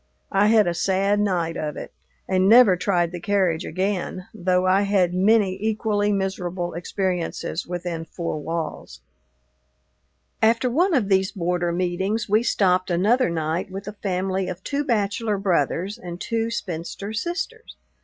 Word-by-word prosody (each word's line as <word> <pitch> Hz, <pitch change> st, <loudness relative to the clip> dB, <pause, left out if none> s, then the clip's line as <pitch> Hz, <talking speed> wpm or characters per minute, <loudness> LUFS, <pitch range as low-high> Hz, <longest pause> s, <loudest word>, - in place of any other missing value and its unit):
I 200 Hz, +2 st, +4 dB
had 215 Hz, -1 st, +5 dB
a 175 Hz, -, 0 dB
sad 195 Hz, +3 st, +1 dB
night 175 Hz, -5 st, 0 dB
of 150 Hz, -2 st, -4 dB
it, -, -, -8 dB, 0.3 s
and 190 Hz, 0 st, +2 dB
never 230 Hz, -4 st, +7 dB
tried 175 Hz, -2 st, 0 dB
the 175 Hz, -, -6 dB
carriage 185 Hz, -3 st, +1 dB
again, 185 Hz, 0 st, -2 dB
though 180 Hz, 0 st, +1 dB
I 185 Hz, +2 st, +4 dB
had 195 Hz, -3 st, +2 dB
many 195 Hz, +1 st, +3 dB
equally 215 Hz, -1 st, 0 dB
miserable 185 Hz, -3 st, -2 dB
experiences 180 Hz, -1 st, -3 dB
within 175 Hz, -2 st, -4 dB
four 165 Hz, -1 st, -4 dB
walls. 160 Hz, -, -5 dB, 1.4 s
After 230 Hz, +3 st, +3 dB
one 350 Hz, +6 st, +2 dB
of 230 Hz, -7 st, +1 dB
these 190 Hz, 0 st, +2 dB
border 175 Hz, -2 st, -1 dB
meetings 185 Hz, +5 st, -1 dB
we 215 Hz, +2 st, +3 dB
stopped 185 Hz, -5 st, +2 dB
another 205 Hz, +7 st, +2 dB
night 165 Hz, +2 st, -2 dB
with 195 Hz, +2 st, -7 dB
a 210 Hz, -, -5 dB
family 190 Hz, -1 st, -2 dB
of 180 Hz, 0 st, -6 dB
two 285 Hz, 0 st, -1 dB
bachelor 215 Hz, -3 st, 0 dB
brothers 190 Hz, -, 0 dB
and 175 Hz, -4 st, -7 dB
two 230 Hz, +2 st, -1 dB
spinster 195 Hz, 0 st, -5 dB
sisters. 360 Hz, -, -4 dB
190 Hz, 145 wpm, -23 LUFS, 175-210 Hz, 1.4 s, never